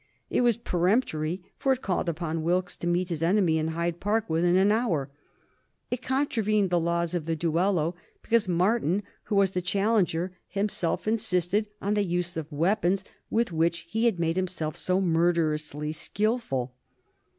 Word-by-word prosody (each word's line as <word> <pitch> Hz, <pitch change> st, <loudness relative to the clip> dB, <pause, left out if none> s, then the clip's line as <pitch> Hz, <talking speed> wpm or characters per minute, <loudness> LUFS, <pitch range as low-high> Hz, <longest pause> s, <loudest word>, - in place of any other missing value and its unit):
It -, -, +2 dB
was 240 Hz, -3 st, +3 dB
peremptory, 180 Hz, -4 st, 0 dB, 0.2 s
for 270 Hz, -, +2 dB
it 260 Hz, -, -6 dB
called 180 Hz, -2 st, 0 dB
upon 165 Hz, -1 st, -2 dB
Wilkes 180 Hz, +3 st, 0 dB
to 175 Hz, -, -4 dB
meet 175 Hz, +1 st, +1 dB
his 165 Hz, -3 st, -3 dB
enemy 170 Hz, -2 st, +3 dB
in 155 Hz, -, -1 dB
Hyde 170 Hz, +1 st, -2 dB
Park 215 Hz, +2 st, 0 dB
within 170 Hz, +2 st, +2 dB
an 195 Hz, +2 st, +4 dB
hour. 170 Hz, -, 0 dB, 0.8 s
It 245 Hz, 0 st, -2 dB
contravened 220 Hz, -8 st, +1 dB
the 175 Hz, -, +3 dB
laws 170 Hz, 0 st, 0 dB
of 170 Hz, -3 st, -2 dB
the 165 Hz, -, 0 dB
duello, 170 Hz, +1 st, +1 dB, 0.3 s
because 230 Hz, -3 st, +2 dB
Martin, 185 Hz, +1 st, +1 dB, 0.2 s
who 210 Hz, -, -1 dB
was 195 Hz, -2 st, +4 dB
the 180 Hz, -, -1 dB
challenger, 185 Hz, -2 st, +1 dB
himself 195 Hz, -2 st, -1 dB
insisted 205 Hz, -1 st, +1 dB, 0.2 s
on 200 Hz, +2 st, +1 dB
the 205 Hz, -1 st, +2 dB
use 175 Hz, -1 st, -2 dB
of 160 Hz, -2 st, -4 dB
the 150 Hz, -, -9 dB
weapons 190 Hz, +3 st, +1 dB, 0.3 s
with 230 Hz, -3 st, +1 dB
which 165 Hz, +1 st, 0 dB
he 225 Hz, +6 st, 0 dB
had 225 Hz, -6 st, +3 dB
made 165 Hz, +1 st, 0 dB
himself 175 Hz, -4 st, -2 dB
so 185 Hz, +1 st, 0 dB
murderously 160 Hz, -4 st, +1 dB
skilful. 160 Hz, -, -1 dB
180 Hz, 165 wpm, -27 LUFS, 165-205 Hz, 0.8 s, an